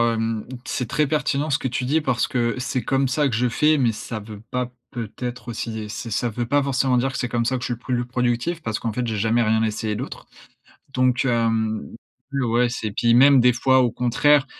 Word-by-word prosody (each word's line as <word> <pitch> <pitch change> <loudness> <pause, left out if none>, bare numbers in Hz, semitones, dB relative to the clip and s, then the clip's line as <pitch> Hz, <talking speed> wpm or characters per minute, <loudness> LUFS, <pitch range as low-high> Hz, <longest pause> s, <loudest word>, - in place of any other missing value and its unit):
hem, 115 -1 0 0.2
c'est 125 - -3
très 150 +2 +2
pertinent 150 0 0
ce 140 - +2
que 130 - -1
tu 125 +1 -2
dis 150 +5 +2
parce 130 -5 0
que 120 -1 0
c'est 125 0 -2
comme 135 0 +1
ça 145 +2 +1
que 115 - -2
je 125 - +2
fais, 150 +5 +3
mais 120 -4 +2
ça 110 +1 -6
veut 105 -1 -10
pas, 125 -1 -2 0.2
peut-être 120 +2 -6
aussi 115 -1 -4
et 105 - -5
ç 115 +2 -6
ça 120 +3 0
veut 120 +2 -3
pas 145 +4 +3
forcément 135 -1 +1
dire 135 +2 0
que 125 - -4
c'est 125 - -1
comme 120 -1 0
ça 130 +3 0
que - - -5
je - - -2
suis - - -2
plus 125 +2 -3
le 120 0 0
productif 125 +7 -1
parce 110 -1 -3
qu'en 115 - -2
fait, 125 +2 -2
j'ai 110 -2 -2
jamais 115 +3 +2
rien 110 +1 +2
essayé 110 0 -1
d'autre. - - -6 0.7
Donc, 130 0 +2
hem, 115 -3 0 0.4
l 140 -2 0
ouais 120 +1 +2
c'est, 110 -3 -4
puis 115 +3 +2
même, 135 +3 +7
des 125 0 +5
fois, 130 +1 +3
au 125 - +3
contraire, 130 +5 +3
125 Hz, 240 wpm, -23 LUFS, 115-130 Hz, 0.7 s, même